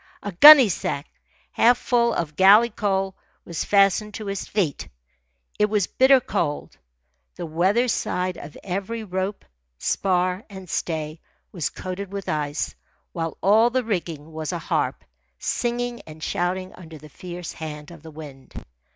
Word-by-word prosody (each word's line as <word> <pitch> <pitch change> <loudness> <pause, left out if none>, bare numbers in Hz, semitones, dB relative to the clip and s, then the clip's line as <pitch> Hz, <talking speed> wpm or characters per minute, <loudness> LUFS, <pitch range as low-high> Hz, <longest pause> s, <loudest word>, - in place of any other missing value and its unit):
A 205 - -4
gunnysack, 210 - +7 0.5
half 240 +1 +4
full 235 -1 +1
of 155 -8 -3
galley 205 +7 +6
coal, 195 -2 -1 0.3
was 170 -2 -3
fastened 200 +1 +2
to 215 - -6
his 200 -1 -4
feet. 180 -9 -1 0.7
It 210 0 +3
was 210 -3 +1
bitter 265 +5 +5
cold. 150 -10 -3 0.6
The 175 - -6
weather 185 +10 +1
side 180 -5 -1
of 145 -2 -10
every 200 +4 -4
rope, 190 0 -4 0.3
spar, 185 - 0
and 190 -2 -10
stay 160 -2 -3 0.3
was 165 -6 -2
coated 185 +1 -6
with 200 -1 -6
ice, 150 -1 -2 0.4
while 165 -2 -4
all 220 +4 +5
the 255 +1 0
rigging 165 -8 -4
was 155 0 -4
a 175 - -2
harp, 165 - -2 0.3
singing 240 0 -2
and 155 0 -11
shouting 185 +3 -2
under 165 -3 -12
the 155 +1 -13
fierce 175 +3 -8
hand 150 -1 -8
of 165 -3 -13
the 160 - -11
wind. 145 -4 -12
185 Hz, 145 wpm, -23 LUFS, 160-210 Hz, 0.7 s, gunnysack